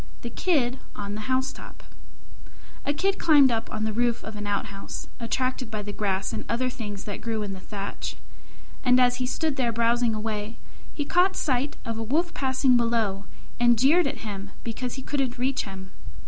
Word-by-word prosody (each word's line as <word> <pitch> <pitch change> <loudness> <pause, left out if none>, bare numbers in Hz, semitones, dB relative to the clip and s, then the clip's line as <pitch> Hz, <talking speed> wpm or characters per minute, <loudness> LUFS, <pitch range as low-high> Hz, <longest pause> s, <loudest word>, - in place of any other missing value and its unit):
THE 235 - -4
KID 265 -8 +1 0.2
ON 200 0 -4
THE 210 0 -5
HOUSETOP 260 +1 -2 1.0
A - - +4
Kid 385 +7 +1
climbed 290 -5 +7
up 225 -1 -1
on 215 - -3
to - - +1
the 220 - -1
roof 240 +1 +1
of 220 - -7
an 210 0 -4
outhouse, 200 -1 -3
attracted 255 +1 -1
by 215 -1 -3
the 205 0 -5
grass 195 -2 -1
and - - -3
other 255 +2 +1
things 205 -5 -5
that 205 - -5
grew 225 -2 -1
in 200 -1 -4
the 190 - -7
thatch; 200 +1 -5 0.7
and 250 -1 +5
as 245 -1 +4
he 250 0 -1
stood 300 +2 -1
there 245 -3 +2
browsing 230 0 +2
away, 215 0 -3 0.4
he 290 - -1
caught 365 +5 +4
sight 270 0 0
of 230 -1 -3
a - - -1
Wolf 325 +9 +1
passing 260 -1 +3
below, 225 -4 +1 0.3
and 240 -1 +5
jeered 295 +7 +5
at 275 -3 -4
him 200 -1 -5
because 245 +2 -3
he 265 - -6
couldn't 265 -4 -1
reach 260 +2 0
him. 190 -1 -8
235 Hz, 190 wpm, -26 LUFS, 210-260 Hz, 1.0 s, climbed